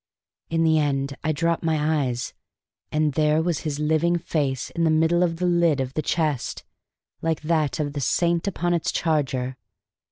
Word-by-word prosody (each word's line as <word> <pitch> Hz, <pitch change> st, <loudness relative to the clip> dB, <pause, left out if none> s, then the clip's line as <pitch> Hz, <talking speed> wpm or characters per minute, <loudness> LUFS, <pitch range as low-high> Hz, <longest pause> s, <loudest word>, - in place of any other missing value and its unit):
In 165 Hz, 0 st, +1 dB
the 160 Hz, -1 st, +4 dB
end 140 Hz, -1 st, 0 dB
I 155 Hz, -, +1 dB
dropped 165 Hz, +3 st, 0 dB
my 155 Hz, -3 st, +1 dB
eyes, 120 Hz, -1 st, -4 dB, 0.6 s
and 155 Hz, -1 st, +1 dB
there 150 Hz, +1 st, +3 dB
was 165 Hz, -2 st, 0 dB
his 150 Hz, -3 st, -3 dB
living 160 Hz, +3 st, +2 dB
face 145 Hz, -6 st, -2 dB
in 170 Hz, -, -1 dB
the 165 Hz, -, +4 dB
middle 160 Hz, +2 st, +3 dB
of 170 Hz, -2 st, +2 dB
the 180 Hz, +2 st, -2 dB
lid 170 Hz, -4 st, +3 dB
of 130 Hz, 0 st, -2 dB
the 155 Hz, -, -1 dB
chest, 150 Hz, -5 st, -1 dB, 0.6 s
like 165 Hz, -1 st, -1 dB
that 155 Hz, -2 st, 0 dB
of 145 Hz, -2 st, -2 dB
the 145 Hz, -, -3 dB
saint 170 Hz, +6 st, +1 dB
upon 175 Hz, -2 st, 0 dB
its 170 Hz, -, 0 dB
charger. 130 Hz, -5 st, -1 dB
155 Hz, 180 wpm, -24 LUFS, 145-165 Hz, 0.6 s, the